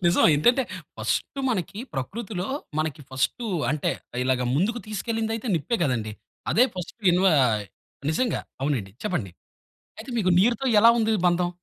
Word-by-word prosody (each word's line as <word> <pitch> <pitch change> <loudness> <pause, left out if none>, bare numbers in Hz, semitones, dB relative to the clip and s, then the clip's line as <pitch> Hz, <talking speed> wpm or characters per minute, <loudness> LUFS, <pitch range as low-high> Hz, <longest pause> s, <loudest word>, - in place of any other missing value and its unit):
నిజం. 170 - +4
ఏంటంటే 240 - +4 0.3
ఫస్టు 275 - -2
మనకి 195 -2 -3 0.2
ప్రకృతిలో 190 - -4 0.3
మనకి 155 -1 -2
ఫస్టు 135 - -1 0.2
అంటే, 150 -1 0 0.3
ఇలాగ 130 -1 +1
ముందుకు 225 +8 +1
తీసుకెళ్ళింది 225 +1 -2
అయితే 230 +1 -6
నిప్పే 175 - -1
కదండి. 115 -6 -1 0.4
అదే 245 - +6
ఫస్టు 180 +6 -7
ఇన్వ 185 +2 +3 0.8
నిజంగా 240 +10 0 0.2
అవునండి. 120 -10 -1
చెప్పండి. 120 - -2 0.7
అయితే 230 +4 -8
మీకు 185 -4 +2
నీరుతో 240 +5 +2
ఎలా 230 - +8
ఉంది 220 0 +2
బంధం? 175 0 +2
185 Hz, 135 wpm, -25 LUFS, 145-225 Hz, 0.8 s, ఎలా